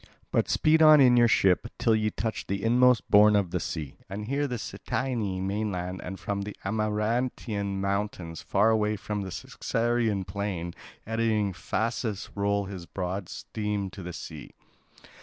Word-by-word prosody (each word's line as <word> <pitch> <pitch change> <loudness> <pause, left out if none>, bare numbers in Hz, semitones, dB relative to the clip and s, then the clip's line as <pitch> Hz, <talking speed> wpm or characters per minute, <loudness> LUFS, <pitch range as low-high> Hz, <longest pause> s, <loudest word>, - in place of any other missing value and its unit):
But - - +1
speed 160 +1 +3
on 155 -1 +9
in 125 -3 +6
your 120 -1 +6
ship, 95 0 +3
till 115 - +3
ye 110 0 +1
touch 110 +2 -4
the 100 0 -2
inmost 125 +1 +4
bourne 105 0 +7
of 100 -4 +1
the 90 - 0
sea. 80 -4 -5
And 105 +2 -5
here 140 +5 0
at - - -4
the 125 - -2
Cytaean 105 -5 -3
mainland 95 -3 -2
and 95 +1 -6
from 100 -1 -3
the 105 +1 -6
Amarantine 105 -1 -1
mountains 100 -4 -2
far 105 +3 +3
away 105 -1 +1
and 105 -1 -1
the 95 - -5
Circaean 115 +1 -1
plain, 90 -3 -4 0.3
eddying 110 -3 0
Phasis 110 +3 -2
rolls 100 -1 0
his 90 -4 -7
broad 95 0 -4
stream 105 -3 -3
to 95 - -9
the 90 0 -6
sea. 80 -2 -9
105 Hz, 160 wpm, -27 LUFS, 95-115 Hz, 0.3 s, on